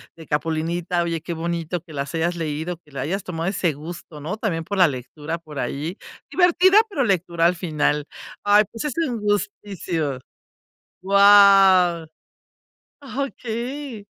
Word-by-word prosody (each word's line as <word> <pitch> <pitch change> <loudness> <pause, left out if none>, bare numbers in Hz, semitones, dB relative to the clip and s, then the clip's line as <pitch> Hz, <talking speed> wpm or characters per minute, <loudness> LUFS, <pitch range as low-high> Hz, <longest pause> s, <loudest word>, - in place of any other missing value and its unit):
de 160 -2 -13
Capulinita. 165 +3 -1
Oye, 170 -1 -2
qué 170 - -5
bonito 170 +1 -3
que 160 -1 -14
las 140 0 -4
hayas 170 +2 0
leído, 160 +1 -3
que 155 -3 -25
le 135 - -7
hayas 190 +6 -2
tomado 165 0 -3
ese 180 -4 0
gusto, 155 0 -9
¿no?, 175 +9 -4
también 175 -7 -2
por 200 +4 -4
la 180 -2 +6
lectura 150 +4 -5
por 155 -3 -12
ahí, 155 +8 -3 0.3
divertida, 365 +2 +4
pero 320 -11 -1
lectura 175 -5 +1
al 180 - +1
final. 155 -4 -1 0.4
Ay, 205 +1 +5
pues 230 - -6
es 295 - -2
un 260 -8 -1
gustísimo. 195 -8 -2 0.8
Guau. 195 -3 +6 1.0
Ajá, 275 -1 -4
okey. 245 -1 -6
175 Hz, 150 wpm, -22 LUFS, 160-205 Hz, 1.0 s, la